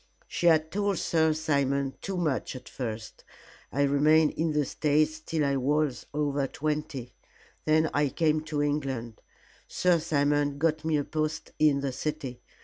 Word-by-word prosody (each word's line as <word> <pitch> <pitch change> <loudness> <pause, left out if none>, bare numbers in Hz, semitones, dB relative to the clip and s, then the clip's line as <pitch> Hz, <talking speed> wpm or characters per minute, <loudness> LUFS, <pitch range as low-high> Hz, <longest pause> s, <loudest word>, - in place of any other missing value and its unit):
She 175 - 0
had 160 -1 +4
told 200 -1 0
Sir 160 -1 +2
Simon 140 -3 0
too 195 -1 -3
much 155 -7 -1
at 125 -1 -9
first. 110 -3 -6 0.5
I 140 - +1
remained 150 +2 +4
in 160 0 -1
the 150 -1 +1
States 155 +2 +1
till 155 -1 -1
I 140 -1 +1
was 145 -1 0
over 145 -2 0
twenty, 150 -4 -3 0.5
then 155 +1 +3
I 145 -1 +2
came 155 +2 +1
to 150 -2 -1
England. 135 -6 -2 0.5
Sir 180 -2 +2
Simon 145 -2 +1
got 155 +1 +1
me 160 -1 +1
a 145 - 0
post 155 +1 -3
in 150 -2 +4
the 140 -1 -1
city. 140 -2 -4
150 Hz, 155 wpm, -28 LUFS, 140-155 Hz, 0.5 s, had